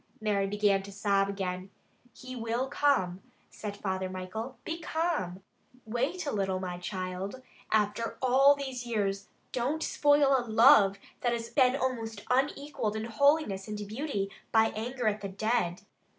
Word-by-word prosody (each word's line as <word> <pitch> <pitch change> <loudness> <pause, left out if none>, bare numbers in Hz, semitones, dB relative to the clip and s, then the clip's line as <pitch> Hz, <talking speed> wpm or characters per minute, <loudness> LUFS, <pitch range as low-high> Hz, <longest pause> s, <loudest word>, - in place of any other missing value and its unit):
Mary 205 -3 +1
began 205 -1 +2
to 200 +1 -10
sob 200 -1 +1
again. 185 -1 -3 0.4
"He 255 0 -9
will 235 +2 -2
come," 195 -12 +1 0.3
said 205 -1 -6
Father 190 -2 -2
Michael. 185 +7 -6
"Be 330 +1 -4
calm! 315 - -2 0.4
Wait 265 +10 -2
a 285 - -1
little, 190 -2 0
my 180 -1 -4
child. 185 +6 -5 0.3
After 215 +1 0
all 270 +2 +5
these 265 -3 -5
years, 200 -4 -1 0.2
don't 270 +6 -1
spoil 290 -2 +4
a 260 - +2
love 220 -4 +6 0.2
that 240 -1 +1
has 230 -1 -4
been 255 -2 +4
almost 230 -6 -2
unequaled 270 -4 0
in 220 - -2
holiness 235 -4 +2
and 210 -1 -4
beauty, 215 -4 -3 0.2
by 225 0 +5
anger 240 +2 -2
at 210 -1 0
the 200 - -4
dead. 200 -3 -1
220 Hz, 150 wpm, -30 LUFS, 195-260 Hz, 0.4 s, love